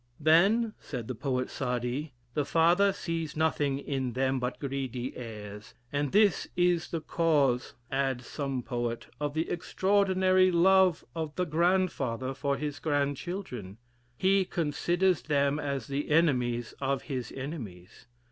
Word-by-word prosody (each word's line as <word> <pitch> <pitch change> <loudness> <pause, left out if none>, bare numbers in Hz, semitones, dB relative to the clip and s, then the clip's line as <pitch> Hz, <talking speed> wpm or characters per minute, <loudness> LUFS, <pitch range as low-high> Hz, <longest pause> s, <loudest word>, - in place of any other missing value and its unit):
'Then,' 195 +9 +4
said 120 -5 -6
the 130 - -3
poet 125 +1 -1
Saadi, 125 +3 -2 0.2
'the 150 - 0
father 170 +7 +4
sees 165 -5 -4
nothing 145 -3 +1
in 135 -3 -3
them 130 +1 +1
but 125 0 -3
greedy 135 -3 -4
heirs,' 105 -3 -8 0.2
and 145 -1 0
this 205 -2 +3
is 175 -1 +2
the 165 - -3
cause, 150 -6 +1 0.2
adds 135 -2 0
some 135 -2 -3
poet, 120 -2 -3
of 145 0 -2
the 160 +1 0
extraordinary 185 0 +3
love 185 0 +4
of 160 -2 -4
the 180 - 0
grandfather 155 -7 +1
for 140 +1 -1
his 145 +1 -4
grandchildren; 145 - -3 0.4
he 195 +3 +3
considers 175 0 +1
them 140 +1 +1
as 140 -5 -2
the 140 +3 -3
enemies 125 -7 +2
of 135 0 0
his 130 -5 -4
enemies. 115 - -8
145 Hz, 135 wpm, -29 LUFS, 130-170 Hz, 0.4 s, Then